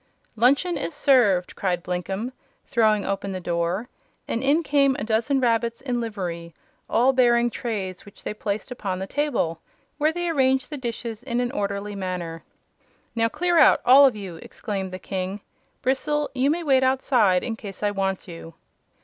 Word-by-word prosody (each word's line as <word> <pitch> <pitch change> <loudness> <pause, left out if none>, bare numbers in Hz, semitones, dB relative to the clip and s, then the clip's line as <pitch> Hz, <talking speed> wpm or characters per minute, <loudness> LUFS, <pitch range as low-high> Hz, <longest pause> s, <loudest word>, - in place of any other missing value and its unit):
"Luncheon 280 - +3
is 325 - -4
served!" 215 -12 +3
cried 180 -3 -1
Blinkem, 190 +6 -3 0.3
throwing 215 -3 +2
open 195 0 -2
the 185 - -4
door, 175 +5 -1 0.4
and 230 - -2
in 290 +5 +3
came 275 -2 +3
a - - -4
dozen 230 +5 +1
rabbits 235 -1 +1
in 250 -3 -2
livery, 175 -7 -5 0.3
all 255 +3 +3
bearing 240 -2 +3
trays 195 -7 -4
which 205 0 -16
they - - -3
placed 210 +3 -4
upon 200 -7 -3
the 190 - -4
table, 195 - -1 0.4
where 305 +2 +3
they 350 +1 -3
arranged 265 -3 +1
the - - -3
dishes 235 -3 -5
in 245 -1 -2
an 245 0 -1
orderly 200 -3 -3
manner. 180 -4 -4 0.7
"Now 230 0 +1
clear 345 +5 +2
out 300 - +6
all 270 +3 +8
of 250 - -1
you!" 190 -5 -7
exclaimed 195 +2 -5
the 185 - -5
King. 190 +1 -4 0.4
"Bristle, 290 +3 0
you 265 +1 +2
may 335 +3 0
wait 270 -4 +4
outside, 250 -8 +3
in 225 - -3
case 200 -2 -9
I 205 - +2
want 195 -1 -2
you." 165 -1 -10
230 Hz, 170 wpm, -24 LUFS, 190-265 Hz, 0.7 s, all